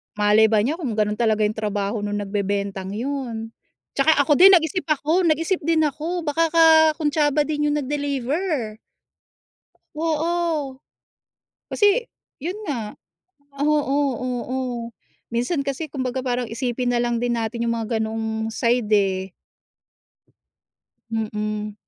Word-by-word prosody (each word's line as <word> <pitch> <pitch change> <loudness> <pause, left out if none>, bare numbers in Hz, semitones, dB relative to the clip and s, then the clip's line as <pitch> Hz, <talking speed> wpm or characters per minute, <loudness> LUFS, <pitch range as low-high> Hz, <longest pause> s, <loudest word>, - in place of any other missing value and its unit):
malay 210 +1 +4
ba 215 -1 +2
niya 305 +9 -1
kung 255 -10 -3
ganun 210 0 0
talaga 220 -2 +2
yung 210 +1 0
trabaho 205 0 -2
nung 205 0 -3
nagbebentang 200 -1 -3
yun, 235 -3 -4 0.4
'tsaka 305 +3 +3
ako 290 +1 +2
din 385 +1 +9
nag-isip 340 +2 0
ako, 315 +4 +1
nag-isip 330 +4 +1
din 320 +1 +1
ako, 320 +4 -2
baka 320 +2 +1
kakuntsaba 310 -2 +4
din 295 0 -1
yung 295 - +1
nag-deliver. 285 - -2 1.2
Oo. 320 -2 -1 0.9
Kasi 415 +4 +2 0.3
yun 340 +7 -4
nga, 235 - -4 0.6
oo, 290 -1 +1 0.2
oo, 255 +1 -3 0.8
minsan 275 +5 -1
kasi, 280 +3 -3
kumbaga, 260 -2 -3
parang 250 -1 -1
isipin 245 +1 -2
nalang 240 0 +1
din 240 0 0
natin 230 +1 -2
yung 230 - +1
mga 225 0 -2
ganoong 220 0 -2
side, 235 0 +1
eh. 190 -2 +1 1.8
Mm. 215 -1 -3
255 Hz, 120 wpm, -22 LUFS, 220-305 Hz, 1.8 s, din